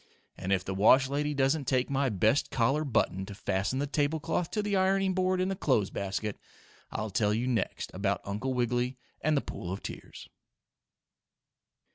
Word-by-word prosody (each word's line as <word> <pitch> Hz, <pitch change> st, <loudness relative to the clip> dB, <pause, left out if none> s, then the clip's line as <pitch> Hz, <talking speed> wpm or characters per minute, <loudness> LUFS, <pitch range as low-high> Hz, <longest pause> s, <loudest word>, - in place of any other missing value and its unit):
And 95 Hz, +1 st, -4 dB
if 95 Hz, -2 st, +1 dB
the 95 Hz, -, -3 dB
wash 130 Hz, +7 st, +5 dB
lady 145 Hz, +1 st, -1 dB
doesn't 140 Hz, +2 st, +2 dB
take 130 Hz, 0 st, +1 dB
my 140 Hz, -1 st, +1 dB
best 110 Hz, +6 st, +2 dB
collar 135 Hz, +5 st, +1 dB
button 110 Hz, -8 st, 0 dB
to 100 Hz, -, -8 dB
fasten 100 Hz, +5 st, -1 dB
the 140 Hz, -, 0 dB
tablecloth 155 Hz, +3 st, 0 dB
to 210 Hz, -, -1 dB
the 205 Hz, -1 st, 0 dB
ironing 190 Hz, 0 st, +2 dB
board 185 Hz, 0 st, +1 dB
in 185 Hz, -, +1 dB
the 195 Hz, -, -1 dB
clothes 130 Hz, -, +1 dB
basket, 100 Hz, +1 st, -3 dB, 0.5 s
I'll 110 Hz, -1 st, -4 dB
tell 105 Hz, +1 st, +2 dB
you 120 Hz, +3 st, -1 dB
next 125 Hz, -3 st, -1 dB
about 100 Hz, +1 st, 0 dB
Uncle 105 Hz, +7 st, -2 dB
Wiggily 125 Hz, +1 st, 0 dB, 0.2 s
and 155 Hz, -1 st, +2 dB
the -, -, +2 dB
pool 90 Hz, -, -6 dB
of 95 Hz, -, -5 dB
tears. -, -, -8 dB
130 Hz, 175 wpm, -30 LUFS, 105-150 Hz, 0.5 s, wash